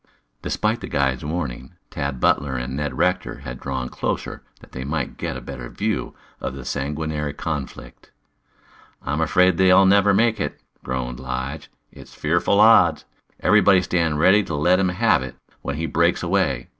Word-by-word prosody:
Despite 110 +2 -1
the - - -6
guide's 65 -3 0
warning, 75 -3 -4 0.2
Tad 70 -2 -3
Butler 70 +1 +1
and 60 +1 -4
Ned 75 +1 -3
Rector 90 -6 0
had 65 -2 -7
drawn 65 -2 -4
closer - - -4 0.2
that - - -18
they 65 - -6
might 70 0 -3
get - - -4
a - - -8
better 65 -3 -8
view - - -3 0.2
of 65 - -5
the 70 -3 -9
sanguinary 75 +2 -3
conflict. 75 -3 -6 0.9
"I'm 75 +4 -2
afraid 90 +2 +3
they'll 95 +1 +6
never 100 +1 +5
make 110 +2 +2
it," - - -4 0.2
groaned 65 -1 -4
Lige. 65 +3 -5 0.2
"It's - - -14
fearful 85 +6 +1
odds. 110 +2 +5 0.4
Everybody 95 -1 +5
stand 85 -4 0
ready 95 +6 +5
to 80 - -4
let 90 +6 +3
him 95 -1 +2
have 90 - +2
it - - -7 0.3
when 70 - -4
he 80 +2 -3
breaks 85 +2 +1
away. 85 -9 0
75 Hz, 165 wpm, -22 LUFS, 65-90 Hz, 0.9 s, they'll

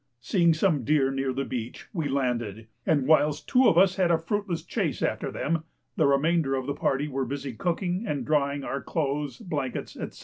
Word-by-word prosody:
Seeing 170 +6 +3
some 155 -5 +2
deer 135 +1 +2
near 135 -1 -1
the 135 +1 -2
beach, 120 -2 -5
we 165 -6 -1
landed, 120 -6 -1 0.2
and 145 -5 +3
whilst 150 0 +3
two 255 -1 +5
of 165 - +4
us 190 +1 +5
had 185 -2 +3
a 170 - +4
fruitless 180 +1 -2
chase - - -2
after - - -1
them 165 +1 -1 0.3
the - - +3
remainder 140 0 +2
of 130 -1 -2
the 140 - -1
party 140 +1 0
were 135 -2 -2
busy 135 +1 -4
cooking 180 - -1
and 145 -7 -2
drying 140 -2 +1
our 140 +1 -3
clothes, 145 -2 -2
blankets, 150 - -4
&c. - - -16
145 Hz, 195 wpm, -27 LUFS, 135-170 Hz, 0.3 s, two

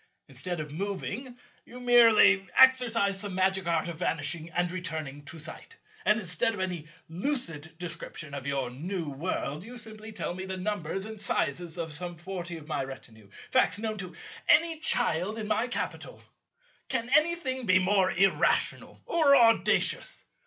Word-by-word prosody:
Instead 175 -2 -4
of 150 -1 -6
moving, 200 - -4 0.3
you 250 - -11
merely 225 -6 +6
exercise 235 -7 +5
some 200 -2 -3
magic 190 0 +1
art 170 +1 +1
of 170 -2 -6
vanishing 160 0 -1
and 175 +1 -1
returning 160 -6 -4
to 165 - -9
sight; 160 - -8 0.3
and 210 +2 +4
instead 195 +4 -1
of - - -8
any 180 -5 -3 0.2
lucid 165 - -4
description 165 -3 -6
of 140 -1 -5
your 135 -3 -1
new 170 +6 -4
World, 150 +1 -3
you 245 +4 -10
simply 220 -1 -8
tell 210 - -4
me 185 +1 -6
the 190 0 -4
numbers 190 -1 -3
and 220 -1 -8
sizes 170 +3 -1
of 160 -2 -3
some 175 +3 -4
forty 175 0 -6
of 155 -2 -12
my 145 -3 -1
retinue, 110 -6 -11 0.2
facts 165 - +3
known 215 0 -3
to 185 -2 -6 0.3
any 325 +1 +5
child 200 - 0
in 215 -1 -4
my 225 +3 +1
capital. 245 - -5 0.7
Can 235 -3 0
anything 305 -6 +1
be 185 -1 +6
more 190 0 +3
irrational 195 +1 +1
or 300 -4 +4
audacious? 230 -3 +3
185 Hz, 160 wpm, -29 LUFS, 165-220 Hz, 0.7 s, merely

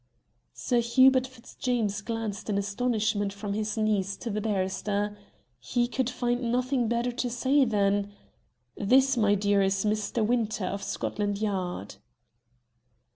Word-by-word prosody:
Sir 245 - +1
Hubert 260 +2 +4
Fitzjames 235 -4 -3
glanced 225 -1 -4
in 200 - +1
astonishment 210 0 0
from 200 0 -5
his 215 +1 -2
niece 205 -3 0
to 235 - -5
the 210 +1 -2
barrister. 205 0 -1 0.4
He 240 -1 0
could 255 0 -1
find 245 -1 -1
nothing 250 0 +1
better 235 +2 0
to 245 0 -2
say 265 +3 +2
than 205 -2 +1 0.6
"This, 260 +6 +3
my 210 -3 +3
dear, 205 0 +2
is 195 +1 +1
Mr. 215 +1 0
Winter, 220 -4 0
of 200 +2 -3
Scotland 205 +1 -2
Yard." 185 - -3
215 Hz, 130 wpm, -27 LUFS, 200-245 Hz, 0.6 s, Hubert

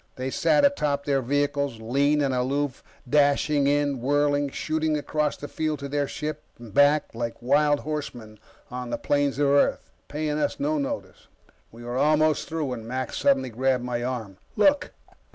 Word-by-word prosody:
They 130 0 -4
sat 160 - +3
atop 150 - 0
their 140 -2 +1
vehicles, 140 -1 -1
lean 140 +6 +1
and 135 -2 0
aloof, 130 +2 -1 0.2
dashing 145 +1 +3
in, 145 -2 +1
whirling, 145 +1 +1
shooting 155 +2 -1
across 150 0 -1
the 145 - -7
field 155 0 -2
to 140 0 -6
their 145 0 -1
ship 155 +2 -5 0.2
and 115 -3 -12
back 145 +2 +3
like 115 0 -4
wild 145 +3 +2
horsemen 120 -8 -6 0.3
on 125 -1 -5
the - - -2
plains 145 -1 0
of 145 -1 +2
Earth, 140 0 +2 0.2
paying 150 0 -2
us 145 - -1
no 150 +2 0
notice. 100 -9 -5 0.4
We 115 +1 -12
were 120 +1 -4
almost 155 +1 +2
through 160 -1 -2
when 120 -4 -5
Mac 130 +2 -3
suddenly 135 -2 +1
grabbed 130 +1 0
my 120 -1 -2
arm. 115 -6 -4 0.2
"Look!" 285 +7 +3
140 Hz, 170 wpm, -25 LUFS, 125-150 Hz, 0.4 s, sat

